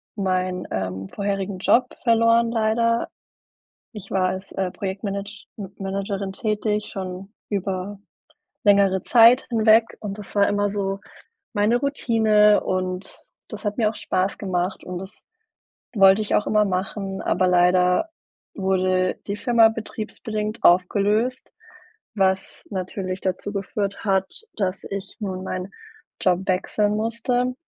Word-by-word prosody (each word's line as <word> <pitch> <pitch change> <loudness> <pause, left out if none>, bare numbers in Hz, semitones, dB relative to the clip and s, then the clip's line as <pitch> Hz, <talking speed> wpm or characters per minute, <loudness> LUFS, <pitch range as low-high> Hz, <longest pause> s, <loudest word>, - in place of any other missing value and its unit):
meinen, 185 -2 -1
ähm, 95 0 -3
vorherigen 195 -1 -3
Job 245 +6 +3 0.2
verloren, 230 0 +4
leider. 230 +1 +1 0.8
Ich 205 -4 -10
war 185 -1 +2
als, 190 +1 -6
äh, 190 -1 -2
Projektmanage 200 +1 -5
M 195 -2 -7
Managerin 195 0 -3
tätig 210 0 -1
schon 190 +1 -7 0.2
über 195 0 -3 0.7
längere 200 -2 +4
Zeit 235 +2 +6
hinweg 225 0 +4
und 205 -1 -6
das 205 - -10
war 200 -1 +4
immer 205 0 +1
so 195 -1 -2 0.5
meine 210 +3 +3
Routine 220 -6 +3
und 185 +1 -3 0.2
das 215 - -9
hat 210 0 -2
mir 215 -3 +3
auch - - -9
Spaß 185 +1 -1
gemacht 185 -1 -2
und 180 -1 -5
das 190 +2 -9 0.8
wollte 195 -1 +6
ich 210 - -2
auch 210 - +2
immer 210 0 +3
machen, 195 0 -3
aber 185 +1 +1
leider 180 - +3 0.4
wurde 185 -1 +1
die 200 - -3
Firma 230 0 +5
betriebsbedingt 215 0 -5
aufgelöst, 205 +7 +2 0.6
was 190 -2 0
natürlich 185 -1 -4
dazu 190 +2 -2
geführt 200 +1 -3
hat, 190 -2 +2 0.3
dass 190 -2 -1
ich 195 -1 -6
nun 190 -3 -4
meinen 185 0 -4 0.5
Job 180 -1 +2
wechseln 205 +3 +1
musste. 240 +3 -1
200 Hz, 130 wpm, -23 LUFS, 185-215 Hz, 0.8 s, Zeit